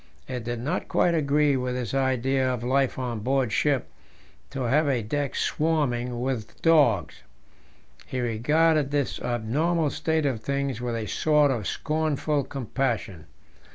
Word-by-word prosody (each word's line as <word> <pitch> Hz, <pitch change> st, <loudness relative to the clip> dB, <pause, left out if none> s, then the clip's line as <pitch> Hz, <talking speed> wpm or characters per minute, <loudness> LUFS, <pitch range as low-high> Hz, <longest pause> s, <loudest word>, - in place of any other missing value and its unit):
It 125 Hz, -2 st, -4 dB
did 120 Hz, 0 st, -3 dB
not 150 Hz, +10 st, -2 dB
quite 175 Hz, -, +2 dB
agree 145 Hz, -2 st, +2 dB
with 125 Hz, -1 st, -2 dB
his 125 Hz, 0 st, -3 dB
idea 130 Hz, 0 st, +1 dB
of 125 Hz, -2 st, -3 dB
life 135 Hz, +1 st, +1 dB
on 125 Hz, -3 st, -3 dB
board 130 Hz, +1 st, 0 dB
ship 130 Hz, -, +1 dB, 0.6 s
to 135 Hz, -, -5 dB
have 145 Hz, +6 st, +2 dB
a 125 Hz, -5 st, +1 dB
deck 140 Hz, +5 st, -2 dB
swarming 125 Hz, -6 st, 0 dB
with 125 Hz, -4 st, -3 dB
dogs. 145 Hz, -, +3 dB, 0.9 s
He 130 Hz, -, -3 dB
regarded 145 Hz, +6 st, +2 dB
this 145 Hz, -2 st, -1 dB
abnormal 145 Hz, +7 st, 0 dB
state 160 Hz, +1 st, 0 dB
of 125 Hz, -6 st, -1 dB
things 140 Hz, -1 st, -2 dB
with 120 Hz, -1 st, -2 dB
a 115 Hz, -1 st, -3 dB
sort 150 Hz, +4 st, +3 dB
of 115 Hz, -6 st, -2 dB
scornful 155 Hz, -2 st, -1 dB
compassion. 115 Hz, -, -3 dB
135 Hz, 145 wpm, -26 LUFS, 120-150 Hz, 0.9 s, dogs